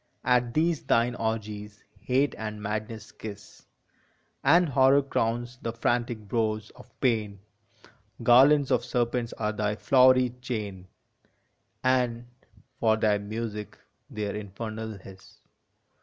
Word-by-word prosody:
At 125 -1 +2
these 160 0 +2
thine 120 +1 +2
orgies 105 -2 -4 0.2
Hate 135 +3 +1
and 110 -1 -6
Madness 110 +1 -5
kiss, 105 -1 -11 0.8
And 170 +5 +5
Horror 135 +1 +4
crowns 120 -1 -2
the 115 - -3
frantic 120 -2 -1
brows 110 -1 -1
of - - -16
Pain; 110 -6 0 0.9
Garlands 135 +4 +6
of 125 -2 +2
serpents 120 -1 -1
are 105 - -2
thy 105 0 -1
flowery 130 +3 +4
chain 105 -7 -5 1.0
And, 125 -2 +1 0.5
for 110 -1 +3
thy 105 -2 +2
music, 105 0 -5 0.3
their 105 -2 -4
infernal 110 +1 -6
hiss. 95 0 -15
115 Hz, 110 wpm, -27 LUFS, 105-125 Hz, 1.0 s, Garlands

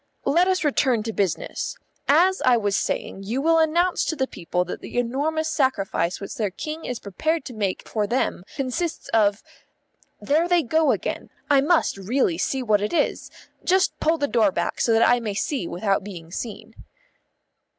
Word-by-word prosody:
"Let 345 +5 +3
us 375 -1 +1
return 260 -6 +2
to 225 0 -4
business. 195 -5 -2 0.3
As 355 +7 +4
I 250 -2 +5
was 205 -3 0
saying, 195 - -2
you 220 +7 -2
will 325 +3 +3
announce 340 +3 +2
to 320 - -1
the 265 -3 0
people 180 -5 -2
that 180 - -6
the - - -7
enormous 290 +7 0
sacrifice 215 - 0
which 200 - -6
their 210 -3 -1
King 305 - -6
is 250 - -3
prepared 310 - -2
to 255 - -7
make 200 -4 -3
for 210 -2 -1
them 240 -5 -1
consists 280 +5 -3
of 210 -2 +2 0.8
There 315 +4 +1
they 350 -2 +3
go 315 +5 +2
again. - - -3 0.2
I 275 -1 +6
must 320 - +2
really 195 -3 0
see 265 +7 -1
what 210 -3 +2
it 210 - -2
is. 340 - 0 0.3
Just 375 +1 +3
pull 325 +1 +2
the 285 - 0
door 220 -6 +3
back 170 -2 -2
so 235 - +2
that 225 +1 +5
I 245 - +4
may 215 -4 -4
see 205 - -2
without 195 +1 0
being 170 -5 -9
seen." 215 +3 -6
245 Hz, 180 wpm, -24 LUFS, 205-315 Hz, 0.8 s, I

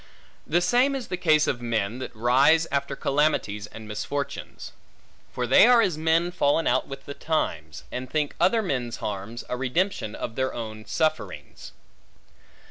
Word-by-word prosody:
The 175 +3 +2
same 250 +9 +3
is 260 -4 -5
the 180 - -1
case 155 -4 +3
of 120 - -2
men, 115 -1 -1
that 130 - -7
rise 135 +8 +4
after 140 0 -1
calamities 135 -9 0
and 110 0 -11
misfortunes. 125 +7 -5 0.6
For 125 - -2
they 130 - +7
are 245 -1 +6
as 195 -8 +2
men 165 +2 +1
fallen 165 -2 +1
out 130 +2 +1
with 135 0 -9
the 140 - -6
times; 155 +2 -3
and 125 0 -5
think 150 -1 -1
other 225 +4 +3
men's 125 - -2
harms, 105 +2 -5
a - - -2
redemption 130 - -1
of 115 - -5
their 130 +2 -2
own 110 -2 -6
sufferings. 105 - -3
140 Hz, 160 wpm, -25 LUFS, 120-165 Hz, 0.6 s, they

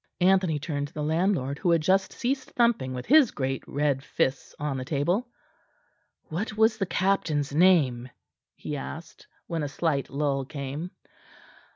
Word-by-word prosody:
Anthony 185 -3 +3
turned 145 -1 -3
to - - -21
the 150 - -3
landlord, 160 -3 0
who 175 - 0
had 170 -2 +4
just 190 +4 +2
ceased 260 +1 -2
thumping 225 - +1
with 125 - -5
his 290 -4 +6
great 135 -1 -3
red 140 -2 0
fists 135 -1 -2
on 145 -2 -2
the 130 - -3
table. 170 - 0 1.0
"What 210 +7 -4
was 220 0 +3
the 195 - 0
captain's 155 -8 0
name?" 145 -8 +3 0.5
he 150 - -5
asked, 160 +4 -8 0.2
when 165 -2 -3
a 145 - -1
slight 140 -1 -1
lull 140 -1 -1
came. 140 +4 -5
155 Hz, 155 wpm, -27 LUFS, 140-190 Hz, 1.0 s, his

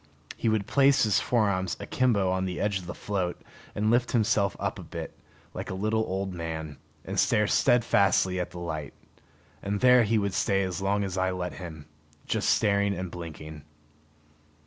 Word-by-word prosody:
He 115 - 0
would 110 -2 +1
place 140 +3 +4
his 105 -4 +3
forearms 100 -6 0
akimbo 105 -8 +1
on 95 0 0
the 90 -1 -4
edge 100 -2 0
of 90 - -11
the 90 - -6
float, 95 -4 -3 0.4
and 105 +1 +1
lift 120 0 +2
himself 110 -4 +2
up - - -3
a - - -8
bit, - - -7 0.4
like - - -6
a 95 - -3
little 110 +3 0
old 95 0 -3
man, 80 -3 -5 0.3
and - - -2
stare 105 - +3
steadfastly 100 -6 +3
at 90 - -2
the - - -11
light. 80 -5 -5 0.7
And 100 +1 -2
there 125 +1 +6
he 110 0 +2
would 100 -2 -1
stay 95 +1 +1
as 95 0 -3
long 100 +1 +1
as 95 -1 -3
I 95 0 +1
let 90 -1 -3
him, 80 -5 -9 0.4
just - - 0
staring 100 -1 +2
and 90 -1 -5
blinking. 80 -2 -8
95 Hz, 180 wpm, -27 LUFS, 90-105 Hz, 0.7 s, there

